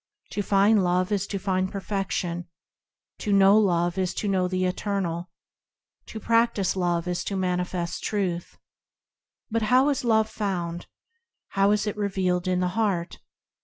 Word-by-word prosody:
To 205 - -2
find 200 +1 +4
Love 180 +2 +1
is 200 -1 0
to 200 - -3
find 190 -1 -1
Perfection; 190 -3 -3 0.7
To 210 - -2
know 195 0 +6
Love 175 -2 +1
is 185 -1 -1
to 210 - -2
know 185 -2 +1
the 185 0 -1
Eternal; 180 -2 -2 0.8
To 220 - -7
practise 230 -4 +2
Love 175 -2 0
is 180 0 -2
to 200 - -3
manifest 180 -1 -2
Truth. 185 -5 -2 0.9
But 230 +1 0
how 260 +3 +5
is 280 -3 -1
Love 220 -2 +3
found? 175 -5 -3 0.6
How 195 +1 +2
is 210 +1 +2
it 210 - -2
revealed 190 -3 -1
in 180 0 +1
the 180 - +1
heart 190 -4 -1
190 Hz, 150 wpm, -25 LUFS, 180-205 Hz, 0.9 s, know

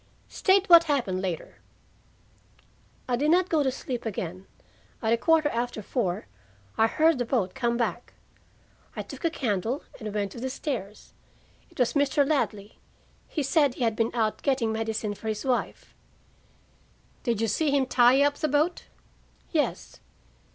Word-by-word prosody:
"State 385 0 +2
what 340 -1 +8
happened 240 - 0
later." 180 -4 -4 1.5
"I 250 - +1
did 290 +5 +1
not 360 +2 +3
go 315 -2 +2
to 265 -2 +1
sleep 250 -2 -5
again. 185 -3 -5 0.5
At 225 -1 +1
a - - +3
quarter 315 +4 +3
after 235 -3 -3
four, 190 -6 -2 0.5
I 225 - +4
heard 315 +3 +2
the - - +1
boat 225 -6 -1
come 240 -2 0
back. 235 0 -3 0.8
I - - -4
took - - -11
a 335 - +3
candle 240 - -2 0.2
and 215 -3 -5
went 200 -1 -2
to 235 - -9
the 260 +2 -3
stairs. 225 - -5 0.6
It - - -21
was 250 -2 +2
Mr. 285 -1 +2
Ladley. 210 -9 -2 0.5
He 300 - -2
said 280 -2 +2
he - - -3
had 225 -2 +1
been 225 0 +1
out 220 -2 0
getting 260 -5 +1
medicine 220 -1 -2
for 205 +2 -9
his 215 +2 -3
wife." 255 -2 -2 1.3
"Did 235 -4 -1
you 225 - +1
see 305 +8 +1
him 280 -1 +2
tie 255 +2 +5
up 285 0 +1
the 310 - 0
boat?" 300 +5 0 0.7
"Yes." 310 -4 -2
245 Hz, 160 wpm, -27 LUFS, 220-285 Hz, 1.5 s, what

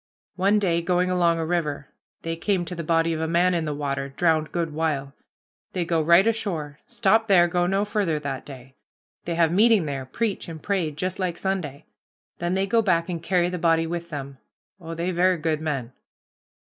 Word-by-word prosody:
One 200 +3 +3
day 175 -5 +1
going 180 +2 +1
along 170 -2 +2
a 165 - -2
river, 150 -4 -2 0.3
they 165 0 -2
came 180 +1 0
to 170 - -6
the 170 -1 -5
body 165 +1 +2
of 160 - -3
a 160 - -1
man 175 +2 +3
in 170 -2 0
the 150 - -2
water, 140 -1 -3
drowned 155 +1 +1
good 165 -3 -2
while. 145 -3 -2 0.6
They 180 -2 -1
go 165 -1 +1
right 170 +5 +5
ashore 175 -10 -2
stop 220 +1 +2
there, 180 -4 +5
go 175 +1 +1
no 195 +2 +1
farther 205 -7 0
that 140 -3 -4
day 130 -2 -12 0.5
they 170 - -2
have 165 -1 +3
meeting 210 -1 +4
there, 135 -3 -4
preach 205 - -3
and 160 -1 -7
pray 185 -1 -1
just 185 +6 -4
like 180 -3 -2
Sunday. 165 -7 -3 0.5
Then 175 +2 -1
they 190 +1 +1
go 230 +3 +2
back 170 -4 +1
and 170 -2 -3
carry 175 0 +1
the 180 0 -4
body 165 -1 +3
with 170 +1 -4
them. 140 -3 -7 0.4
Oh, 165 -2 -7
they 170 +2 -2
ver' 180 +1 +2
good 155 -1 -1
men." 135 -6 -3
170 Hz, 200 wpm, -24 LUFS, 155-185 Hz, 0.6 s, right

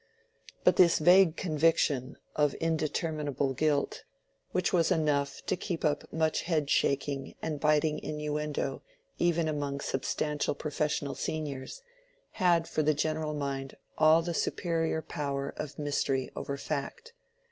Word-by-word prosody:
But - - +4
this 170 -2 +6
vague 175 +1 +6
conviction 150 -5 +1 0.2
of 150 -2 +2
indeterminable 155 -3 -1
guilt, 145 0 0 0.5
which 185 0 0
was 170 -3 +3
enough 145 -3 0
to - - +1
keep 170 -2 -3
up 150 -1 -1
much 160 -1 +1
head 155 -5 0
shaking 140 0 0
and 155 -2 -3
biting 150 0 +2
innuendo 150 0 -3 0.4
even 170 -2 +2
among 145 -2 -2
substantial 145 +2 -1
professional 150 -1 -2
seniors, 150 - -4 0.5
had 175 -4 +2
for - - 0
the 155 0 +2
general 155 0 -1
mind 135 -2 -4 0.2
all 160 +1 +5
the 170 0 -2
superior 165 -1 -1
power 140 -1 -3
of 150 -2 -6
mystery 140 -3 -1
over 140 - -4
fact. 155 - -5
150 Hz, 125 wpm, -30 LUFS, 140-160 Hz, 0.5 s, this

